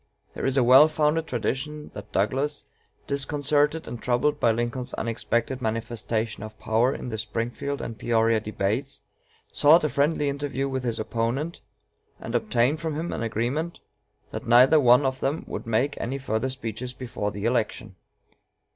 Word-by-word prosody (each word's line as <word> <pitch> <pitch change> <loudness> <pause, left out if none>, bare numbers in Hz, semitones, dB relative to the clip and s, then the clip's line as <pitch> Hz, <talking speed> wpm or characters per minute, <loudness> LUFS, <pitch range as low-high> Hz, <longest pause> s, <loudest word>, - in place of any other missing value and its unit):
There - - -2
is 135 0 +1
a 130 - +5
well 130 +5 +8
founded 155 +1 +1
tradition 135 +5 -3
that - - -9
Douglas, 135 +9 0 0.4
disconcerted 145 +2 0
and 120 - -6
troubled 125 +4 +1
by 115 - +4
Lincoln's 120 +2 -3
unexpected 120 +2 -1
manifestation 115 -1 -2
of 110 0 -8
power 115 +4 +2
in - - -6
the 110 -2 -4
Springfield 115 +6 -3
and 115 - -5
Peoria 115 -1 +2
debates, 110 +6 -2 0.5
sought 155 +3 +6
a 150 - +1
friendly 145 +1 +1
interview 140 -1 -2
with 130 -1 -3
his 115 -2 -1
opponent, 120 +9 -2 0.6
and - - -7
obtained 145 - +1
from 160 -2 -2
him 165 +3 -3
an - - -4
agreement 120 +9 -2 0.5
that - - -6
neither 125 +6 +7
one 125 +1 +5
of 130 0 -1
them 145 +4 -1
would - - -6
make 120 +6 0
any 130 +4 -2
further 130 -1 -1
speeches 125 -1 -5
before 120 -5 -4
the 100 +1 -5
election. 110 -4 -1
125 Hz, 155 wpm, -25 LUFS, 115-145 Hz, 0.6 s, well